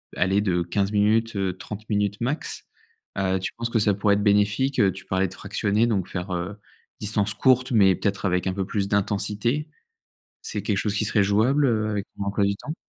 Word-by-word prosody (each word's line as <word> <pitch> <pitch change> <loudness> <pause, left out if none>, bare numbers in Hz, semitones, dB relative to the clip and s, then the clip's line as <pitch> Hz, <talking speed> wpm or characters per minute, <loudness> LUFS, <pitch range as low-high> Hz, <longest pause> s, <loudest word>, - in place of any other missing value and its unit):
allez, 95 +3 +2
de 90 -4 +1
15 100 +3 -1
minutes, 110 +2 +2
heu, 95 -2 -1
30 105 +2 -9
minutes 105 0 0
max, 135 +6 -3 0.5
heu, 95 -1 +1
tu 95 - -3
penses 115 0 -3
que 115 - +2
ça 105 -1 +2
pourrait 100 +1 +2
être 100 0 +1
bénéfique? 105 +7 +2
Heu, 100 -4 +4
tu 95 0 -11
parlais 95 +1 0
de 90 - -10
fractionner 105 +4 0
donc 100 -6 0
faire, 90 0 -5
heu, 90 +4 -4 0.4
distance 105 -1 0
courte, 130 +4 +3
mais 95 -5 +5
peut-être 100 +1 -2
avec 90 -1 +1
un 95 - 0
peu 95 0 -2
plus 100 0 -2
d'intensité. 105 +8 -1 0.7
C'est 455 - -4
quelque 105 -4 -1
chose 100 +1 -1
qui 110 - 0
serait 105 -1 +2
jouable, 115 +9 +3
heu, 110 -4 +1
avec 105 -2 -2
ton 100 - -4
emploi 100 0 +1
du 100 0 0
temps? 155 +9 -7
100 Hz, 210 wpm, -24 LUFS, 95-110 Hz, 0.7 s, mais